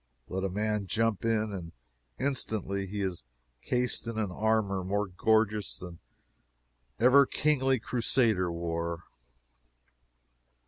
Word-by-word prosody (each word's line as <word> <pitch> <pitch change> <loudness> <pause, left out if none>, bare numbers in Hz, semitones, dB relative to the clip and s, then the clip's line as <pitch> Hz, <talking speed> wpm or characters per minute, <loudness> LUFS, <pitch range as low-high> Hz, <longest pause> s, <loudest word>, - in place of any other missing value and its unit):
Let 95 +1 -3
a 95 - 0
man 105 +1 -1
jump 115 0 0
in, 110 -1 +1
and 85 -4 -7 0.5
instantly 105 -8 -1
he 100 +2 -4
is 90 -8 -2 0.4
cased 125 - 0
in 115 -1 -4
an 105 -4 -1
armor 105 -1 +1
more 100 +3 0
gorgeous 105 +2 +1
than 90 -2 -9 1.0
ever 130 +4 +6
kingly 135 -3 +2
Crusader 115 -6 +1
wore. 85 0 -3
105 Hz, 110 wpm, -29 LUFS, 95-115 Hz, 1.0 s, ever